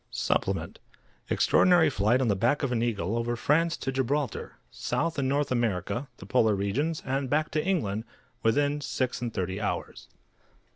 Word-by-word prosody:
SUPPLEMENT - - -1 0.5
_Extraordinary 175 -4 +4
flight 115 +4 +2
on 130 - +1
the 100 - +2
back 120 +9 +1
of 135 - 0
an 115 -2 0
eagle, 110 -4 -1
over 120 +1 -1
France 165 +7 +2
to 135 - -3
Gibraltar, 135 +2 -2
South 165 -1 -2
and 130 -1 0
North 140 0 0
America, 120 +1 -1
the - - -11
Polar 110 -4 +3
Regions, 135 +12 -1
and 135 0 -1
back 155 +2 +1
to 155 0 0
England, 115 - -1 0.4
within 145 +6 +2
six 130 -3 -2
and 120 -1 -2
thirty 95 0 -3
hours. 105 - -4
130 Hz, 160 wpm, -28 LUFS, 110-145 Hz, 0.5 s, Extraordinary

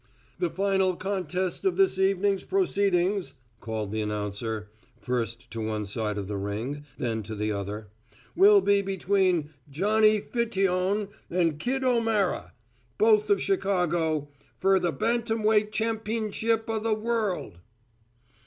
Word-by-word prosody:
"The 355 - +1
final 190 -1 +1
contest 185 -1 -2
of 385 -2 +1
this 385 - +3
evening's 195 0 +2
proceedings," 200 - +1 0.2
called 110 -3 -4
the 110 0 -1
announcer, 105 +1 -3 0.3
first 115 0 -3
to 115 - -4
one 110 -1 -2
side 105 +1 -3
of 100 -2 -4
the 100 -1 -3
ring, 115 +9 -4
then 115 -3 -2
to 110 +1 -7
the 105 +1 -1
other, 105 +1 -4 0.5
"will 400 +2 +7
be 200 - +3
between 190 -4 +1 0.2
Johnny 215 +7 +3
Fiteon 195 -3 0 0.2
and 165 -4 +1
Kid 265 +8 -1
O'Mara, 225 -6 +1 0.5
both 215 -1 +4
of 200 -1 +4
Chicago, 175 -6 0 0.3
fer 195 0 +3
th' 170 -7 -1
bantamweight 220 - +1
champ'nship 220 0 -1
o' 225 -1 -1
th' 215 0 0
world." 215 - -2
190 Hz, 125 wpm, -27 LUFS, -, 0.5 s, will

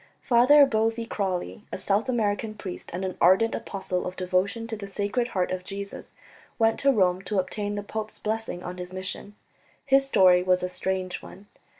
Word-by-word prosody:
Father 270 +4 +6
Boevey 225 -1 0
Crawley, 185 - -3
a - - -3
South 200 +5 0
American 215 -2 0
priest 195 -3 -7
and 185 +2 -3
an 185 - -4
ardent 190 +6 +5
apostle 185 -2 -3
of 180 - -6
devotion 185 +5 0
to 225 -1 -4
the 205 -2 -7
Sacred 205 +5 -1
Heart 185 -7 -1
of 185 0 -3
Jesus, 200 +1 -7 0.4
went 225 -1 +2
to 275 - +4
Rome 185 -6 +2
to 195 +2 -3
obtain 205 +2 -2
the 205 - -4
pope's 215 +1 -5
blessing 215 -4 -3
on 180 +1 -6
his 180 0 -7
mission. 185 +2 -5 0.5
His 270 0 +4
story 185 -7 +5
was 180 0 +2
a 180 - -1
strange 185 0 -2
one. 195 - -13
200 Hz, 185 wpm, -26 LUFS, 185-225 Hz, 0.5 s, Father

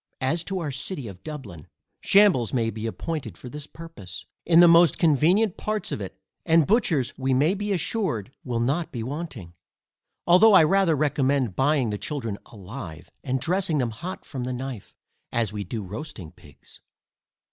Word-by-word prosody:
As 160 +6 0
to 195 - -3
our 160 -5 -3
City 135 0 -4
of 95 -2 -10
Dublin, 110 - -8 0.3
shambles 195 - +4
may 115 -2 +1
be 110 +1 -5
appointed 115 - -5
for 125 - -10
this 150 +2 -8
purpose, 165 - -10 0.2
in 165 0 +6
the 175 - +9
most 170 0 +6
convenient 170 - +3
parts 215 0 -3
of - - -3
it, 95 -1 -7 0.3
and 165 -2 +4
butchers 170 - +1
we 130 0 +1
may 150 +8 +3
be 205 +1 -3
assured 175 - -1
will 120 -3 -2
not 140 +8 -1
be 120 -4 -4
wanting; 130 - -6 0.7
although 190 +5 +6
I 185 - +8
rather 190 0 +3
recommend 140 -6 +1
buying 135 -3 +2
the 105 - -3
children 115 -9 -4
alive, 95 - -9
and 130 -1 -1
dressing 180 +2 0
them 125 -4 0
hot 175 - -7
from 130 -4 -5
the 125 +1 -3
knife, 125 -4 -7 0.4
as 115 -3 -1
we 105 -1 -3
do 105 +3 -5
roasting 100 - -7
pigs. - - -18
140 Hz, 170 wpm, -25 LUFS, 115-170 Hz, 0.7 s, the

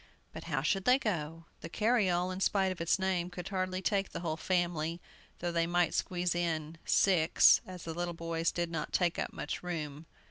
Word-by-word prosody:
But - - -8
how 145 -5 -1
should 195 +4 0
they 250 +1 +6
go? 165 - -3
The 165 - -8
carryall, 185 -4 +1
in 185 - -5
spite 195 -1 +2
of 185 - -6
its 165 - +2
name, 185 -2 0
could 180 0 -7
hardly 185 -1 -2
take 195 0 +1
the - - -6
whole 160 -3 -2
family, 170 -1 -1 0.4
though 175 0 -2
they 170 0 +1
might 175 0 +2
squeeze 180 -1 0
in 165 -2 -2
six, 175 -5 +5
as 185 -2 -8
the 165 - -5
little 175 0 -3
boys 165 0 -1
did 170 -1 -2
not 160 -2 -4
take 175 -2 +1
up - - -2
much - - -5
room. 160 -3 -5
175 Hz, 200 wpm, -32 LUFS, 165-185 Hz, 0.4 s, they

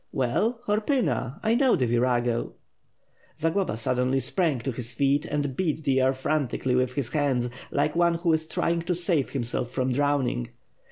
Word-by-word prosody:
"Well, 205 - 0
Horpyna. 210 - 0
I 220 - +3
know 260 +1 +4
the 130 - +1
virago." 120 0 +1 0.8
Zagloba 165 - 0
suddenly 125 +3 +1
sprang 165 -1 0
to 135 - -2
his 120 0 -6
feet, 140 +2 +2
and 145 -3 -2
beat 160 -2 -1
the 135 -2 +2
air 130 +1 +4
fran 140 +2 0
tically 125 +1 -1
with 125 0 +1
his 130 -3 -3
hands; 130 -5 +1 0.2
like 150 - 0
one 170 0 +3
who 165 -1 +1
is 160 0 0
trying 170 +1 0
to 180 +1 -1
save 170 -5 0
himself 120 -2 -2
from 130 0 -1
drowning. 135 - 0
140 Hz, 170 wpm, -26 LUFS, 125-170 Hz, 0.8 s, know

